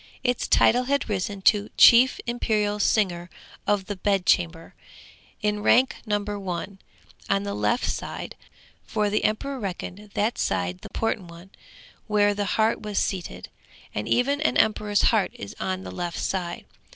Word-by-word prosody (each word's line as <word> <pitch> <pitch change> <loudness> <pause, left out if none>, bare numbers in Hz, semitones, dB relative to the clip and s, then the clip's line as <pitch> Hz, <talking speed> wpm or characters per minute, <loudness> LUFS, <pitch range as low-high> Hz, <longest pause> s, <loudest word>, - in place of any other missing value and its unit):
Its 245 -2 0
title 250 +2 +4
had 280 +2 0
risen 200 -1 -3
to 205 0 +4
be - - -16
'Chief 245 +2 +7
Imperial 215 -3 0
Singer 180 -5 +1 0.4
of 205 -2 +1
the 205 - -4
Bed 195 -1 0
Chamber,' 165 -2 +1 0.7
in 210 0 0
rank 255 +5 +3
number 205 -1 -2
one, 190 +1 -5 0.5
on 100 0 +2
the 100 0 -3
left 105 +1 0
side; - - -5 0.5
for 210 -1 -1
the 215 - 0
emperor 270 +6 -1
reckoned 200 0 -6
that 220 +3 0
side 90 0 -1
the - - -10
important 220 -5 -2
one, 170 +3 -13 0.6
where 205 -1 +3
the 205 0 -2
heart 220 0 +2
was 210 -2 -5
seated. 185 -3 -3 0.4
And - - -3
even 280 +4 +2
an 310 - +1
emperor's 210 -1 +2
heart 210 -6 +2
is 100 0 -8
on 185 0 -3
the - - -7
left 175 -1 -4
side. 180 -3 -3
205 Hz, 160 wpm, -25 LUFS, 180-220 Hz, 0.7 s, Chief